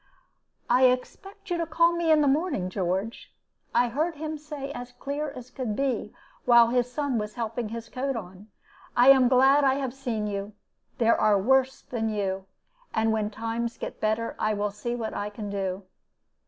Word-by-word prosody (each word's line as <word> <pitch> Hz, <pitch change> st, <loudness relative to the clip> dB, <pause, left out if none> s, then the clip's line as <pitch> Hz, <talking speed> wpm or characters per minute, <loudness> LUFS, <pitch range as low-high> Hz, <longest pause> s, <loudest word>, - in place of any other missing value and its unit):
"'I 250 Hz, +2 st, +5 dB
expect 305 Hz, +11 st, -2 dB
you 350 Hz, -, +1 dB
to 335 Hz, -, -1 dB
call 335 Hz, +1 st, +3 dB
me 340 Hz, -1 st, 0 dB
in 310 Hz, -1 st, +6 dB
the 290 Hz, -, +3 dB
morning, 275 Hz, -, 0 dB
George,' 190 Hz, +4 st, -2 dB, 0.4 s
I 245 Hz, -, +3 dB
heard 310 Hz, +7 st, -1 dB
him 310 Hz, +1 st, -4 dB
say, 295 Hz, -2 st, -7 dB
as 245 Hz, -2 st, -8 dB
clear 285 Hz, +4 st, -4 dB
as 255 Hz, -2 st, -10 dB
could 240 Hz, -6 st, -3 dB
be, 255 Hz, -5 st, -1 dB, 0.3 s
while 235 Hz, -1 st, +6 dB
his 245 Hz, 0 st, +1 dB
son 270 Hz, -2 st, -1 dB
was 210 Hz, 0 st, -5 dB
helping 230 Hz, -1 st, -3 dB
his 230 Hz, 0 st, -6 dB
coat 270 Hz, +2 st, -3 dB
on. 190 Hz, -1 st, -8 dB, 0.5 s
'I 245 Hz, +2 st, +7 dB
am 265 Hz, -2 st, +7 dB
glad 270 Hz, +3 st, +5 dB
I 265 Hz, -1 st, +4 dB
have 265 Hz, -3 st, -3 dB
seen 245 Hz, -6 st, -3 dB
you. 200 Hz, 0 st, -4 dB, 0.4 s
There 230 Hz, -1 st, +3 dB
are 210 Hz, -2 st, +4 dB
worse 265 Hz, +5 st, +2 dB
than 225 Hz, -3 st, -2 dB
you. 195 Hz, -2 st, -2 dB, 0.5 s
And 220 Hz, 0 st, +2 dB
when 220 Hz, -1 st, 0 dB
the 215 Hz, -, -18 dB
times 230 Hz, +1 st, -3 dB
get -, -, -7 dB
better, 220 Hz, +2 st, 0 dB
I 215 Hz, 0 st, +1 dB
will 205 Hz, 0 st, -1 dB
see 235 Hz, +4 st, -4 dB
what 225 Hz, -2 st, -4 dB
I 205 Hz, +1 st, -3 dB
can 205 Hz, -1 st, -6 dB
do.' 195 Hz, -1 st, -3 dB
240 Hz, 190 wpm, -27 LUFS, 215-275 Hz, 0.5 s, I